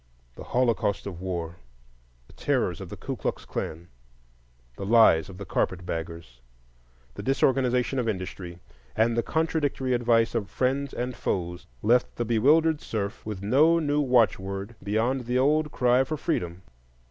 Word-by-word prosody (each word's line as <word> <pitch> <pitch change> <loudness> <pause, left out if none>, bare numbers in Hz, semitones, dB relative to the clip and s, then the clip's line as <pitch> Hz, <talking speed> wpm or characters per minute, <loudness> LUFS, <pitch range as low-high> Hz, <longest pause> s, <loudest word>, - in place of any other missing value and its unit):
The - - -10
holocaust 115 -5 0
of 90 -4 -7
war, 85 -2 -4 0.7
the - - -20
terrors - - -1
of - - -7
the - - -8
Ku - - -5
Klux - - -4
Klan, 85 +2 -5 0.9
the - - -7
lies 100 -6 +5
of 95 - -10
carpet 90 -1 -1
baggers, 85 -7 -6 0.7
the - - -7
disorganization 130 -1 +1
of 115 -2 0
industry, 95 -3 -5 0.4
and 115 +1 +2
the 115 - +2
contradictory 145 -4 -1
advice 115 -1 +2
of 110 -4 -2
friends 135 +2 -1
and 125 0 -4
foes, 90 -5 -3 0.2
left 120 +2 +2
the 120 - -2
bewildered 150 +8 +3
serf 105 -2 -4
with 100 -3 -5
no 150 +10 +4
new 150 -2 +1
watchword 100 -5 +1
beyond 115 +5 0
the 125 +1 +1
old 150 +3 +2
cry 125 +1 +3
for 155 +3 -4
freedom. 90 - -2
115 Hz, 145 wpm, -26 LUFS, 95-130 Hz, 0.9 s, lies